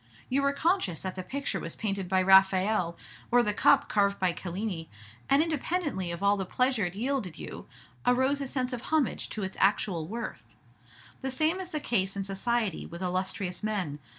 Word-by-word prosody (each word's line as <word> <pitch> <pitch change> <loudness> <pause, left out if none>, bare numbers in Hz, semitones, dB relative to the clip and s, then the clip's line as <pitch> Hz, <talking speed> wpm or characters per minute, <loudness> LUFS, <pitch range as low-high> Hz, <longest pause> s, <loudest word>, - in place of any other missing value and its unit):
You 270 +2 +2
were 280 0 +3
conscious 280 - 0
that 185 -1 -3
the 185 - -5
picture 275 +9 -3
was - - -5
painted 195 -4 -2
by 190 0 +3
Raphael, 190 -1 +4 0.3
or 245 0 +5
the 210 -2 0
cup - - +4
carved 200 -1 +2
by 185 -2 +1
Cellini, 180 -1 -4 0.4
and, 275 +3 +5
independently 305 - -1
of 170 +3 -5
all 200 +1 +4
the 195 - -1
pleasure 250 +2 +1
it 175 +1 -4
yielded 235 - -2
you, - - -8 0.4
arose 260 +3 +2
a 275 - -2
sense 255 -1 -2
of 245 - -3
homage 310 -3 0
to 215 - -4
its 190 0 -5
actual 190 -4 +2
worth. 165 - -6 0.7
The 265 - -2
same 310 +7 +1
is 370 -2 -5
the 310 -4 -2
case 195 -8 0
in 200 - -2
society 200 0 -1
with 170 +2 -7
illustrious 185 0 -2
men. 195 -9 -2
205 Hz, 185 wpm, -29 LUFS, 185-260 Hz, 0.7 s, or